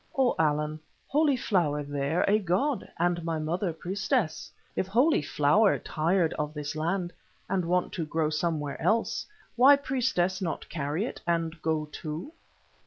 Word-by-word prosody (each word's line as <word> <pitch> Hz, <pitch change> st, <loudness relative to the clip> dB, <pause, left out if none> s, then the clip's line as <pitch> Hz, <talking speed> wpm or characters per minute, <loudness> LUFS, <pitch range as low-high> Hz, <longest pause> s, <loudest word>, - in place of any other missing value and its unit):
"O 260 Hz, -2 st, +4 dB
Allan, 150 Hz, 0 st, +1 dB, 0.3 s
Holy 290 Hz, -2 st, +2 dB
Flower 165 Hz, -11 st, +1 dB
there 145 Hz, +3 st, 0 dB
a 210 Hz, +2 st, +4 dB
god, 205 Hz, -, 0 dB
and 175 Hz, 0 st, +1 dB
my 165 Hz, -1 st, -1 dB
mother 170 Hz, +4 st, -1 dB
priestess. 190 Hz, -, -2 dB, 0.2 s
If 185 Hz, -, -1 dB
Holy 245 Hz, -, +3 dB
Flower 150 Hz, +9 st, +3 dB
tired 165 Hz, +2 st, 0 dB
of 150 Hz, +1 st, -3 dB
this 150 Hz, 0 st, -4 dB
land, 175 Hz, +3 st, -1 dB, 0.3 s
and 185 Hz, -3 st, 0 dB
want 180 Hz, +1 st, 0 dB
to 165 Hz, -, -2 dB
grow 155 Hz, 0 st, 0 dB
somewhere 155 Hz, -2 st, -2 dB
else, 225 Hz, +1 st, +1 dB, 0.3 s
why 265 Hz, +4 st, +8 dB
priestess 245 Hz, -10 st, 0 dB
not 170 Hz, -4 st, -3 dB
carry 150 Hz, +5 st, -2 dB
it -, -, -7 dB
and 165 Hz, -1 st, -1 dB
go 160 Hz, -1 st, 0 dB
too?" 155 Hz, -, -6 dB
170 Hz, 150 wpm, -28 LUFS, 155-200 Hz, 0.3 s, why